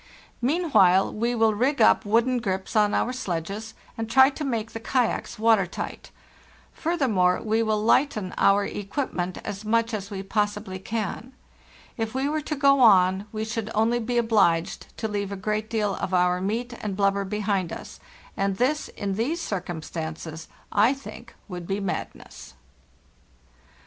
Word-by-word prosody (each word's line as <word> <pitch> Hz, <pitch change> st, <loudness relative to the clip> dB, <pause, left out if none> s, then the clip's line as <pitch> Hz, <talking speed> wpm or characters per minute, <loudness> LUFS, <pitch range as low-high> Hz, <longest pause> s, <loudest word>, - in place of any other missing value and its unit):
Meanwhile 245 Hz, -, +3 dB
we 235 Hz, +3 st, -1 dB
will 225 Hz, -1 st, +3 dB
rig 260 Hz, +7 st, +1 dB
up -, -, +5 dB
wooden 235 Hz, +4 st, +2 dB
grips 190 Hz, -3 st, -3 dB
on 210 Hz, -1 st, +3 dB
our 250 Hz, -, 0 dB
sledges, 200 Hz, -1 st, -4 dB, 0.2 s
and 225 Hz, -1 st, -4 dB
try 265 Hz, +4 st, +6 dB
to 300 Hz, -, -6 dB
make 230 Hz, -5 st, -2 dB
the 225 Hz, -, -6 dB
kayaks 245 Hz, +1 st, -1 dB
water 220 Hz, -4 st, +3 dB
tight. -, -, -6 dB, 0.6 s
Furthermore, 235 Hz, -, +1 dB
we 220 Hz, +1 st, 0 dB
will 215 Hz, -1 st, +1 dB
lighten 215 Hz, -3 st, +2 dB
our 200 Hz, +1 st, +4 dB
equipment 195 Hz, -4 st, -3 dB
as 205 Hz, 0 st, -5 dB
much 230 Hz, +2 st, +1 dB
as 200 Hz, -2 st, -4 dB
we 195 Hz, -1 st, -5 dB
possibly 205 Hz, -1 st, -2 dB
can. 225 Hz, +4 st, -4 dB, 0.6 s
If 225 Hz, 0 st, -3 dB
we 265 Hz, +1 st, 0 dB
were 305 Hz, +1 st, -1 dB
to 300 Hz, +1 st, -3 dB
go 275 Hz, -1 st, +4 dB
on 190 Hz, -3 st, +5 dB
we 220 Hz, 0 st, -3 dB
should 220 Hz, -1 st, -3 dB
only 225 Hz, +3 st, +2 dB
be 240 Hz, +1 st, -2 dB
obliged 205 Hz, -8 st, +2 dB
to 220 Hz, -, -2 dB
leave 200 Hz, -2 st, -3 dB
a -, -, -3 dB
great 215 Hz, +2 st, -2 dB
deal 210 Hz, -3 st, 0 dB
of 185 Hz, 0 st, -2 dB
our 180 Hz, 0 st, +2 dB
meat 230 Hz, +5 st, -2 dB
and 200 Hz, -3 st, -4 dB
blubber 200 Hz, 0 st, +2 dB
behind 195 Hz, -3 st, -1 dB
us, -, -, -8 dB, 0.4 s
and 195 Hz, -1 st, -1 dB
this, 285 Hz, +5 st, +1 dB
in 200 Hz, -1 st, -4 dB
these 250 Hz, -, -1 dB
circumstances, 160 Hz, -, -5 dB, 0.2 s
I 220 Hz, +7 st, +4 dB
think 240 Hz, -3 st, -11 dB
would 180 Hz, -3 st, -7 dB
be 195 Hz, +1 st, -1 dB
madness. 195 Hz, -2 st, -6 dB
215 Hz, 160 wpm, -25 LUFS, 195-235 Hz, 0.6 s, try